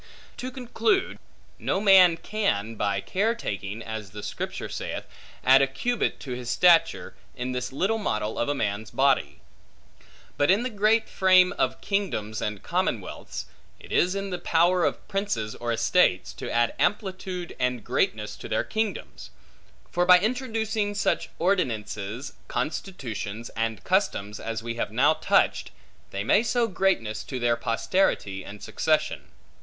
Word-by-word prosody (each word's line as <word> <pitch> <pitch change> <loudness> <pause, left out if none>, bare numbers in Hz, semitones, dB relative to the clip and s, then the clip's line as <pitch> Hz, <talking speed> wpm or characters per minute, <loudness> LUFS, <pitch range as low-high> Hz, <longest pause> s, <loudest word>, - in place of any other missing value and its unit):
To 255 - -4
conclude: 265 - 0 0.4
no 190 - 0
man 190 -4 +7
can 165 - -1
by 100 -2 -1
care 215 - 0
taking 100 - -5
(as 110 -3 -6
the 105 +1 -9
Scripture - - -4
saith) - - -5 0.4
add 130 +1 +7
a 135 - +4
cubit 240 - -1
to 135 - -7
his 125 -1 -5
stature, 170 +5 +4 0.2
in 125 +1 -3
this 125 0 -3
little 195 +11 0
model 110 - -2
of 120 - 0
a 145 - +1
man's 105 -3 -2
body; 130 - +1 1.0
but 145 - +2
in 200 +5 +4
the 255 - -3
great 215 +2 +2
frame 185 -1 +5
of - - -1
kingdoms 165 - -2
and 105 -2 -3
commonwealths, - - -3 0.3
it - - -14
is 180 +2 +2
in 195 0 -3
the 180 - -3
power 175 +2 +3
of - - -2
princes 195 - -2
or 120 0 -3
estates, 115 - +2
to - - -6
add 120 0 +2
amplitude 185 -3 -2
and 125 -3 0
greatness - - -1
to - - -9
their - - +1
kingdoms; 220 -1 -4 0.6
for 175 - +2
by 180 0 +8
introducing 220 -2 -1
such 200 - 0
ordinances, 120 - -1
constitutions, 120 - -4
and 115 -1 -3
customs, 105 - 0
as 115 0 -4
we 115 0 -3
have 115 -3 -3
now 135 +7 +4
touched, 155 - +2 0.4
they 100 +1 -3
may 200 - +4
sow 240 +1 +1
greatness 185 - 0
to 130 - -5
their 120 -1 +2
posterity 115 - 0
and 100 +2 -10
succession. - - 0
145 Hz, 150 wpm, -26 LUFS, -, 1.0 s, by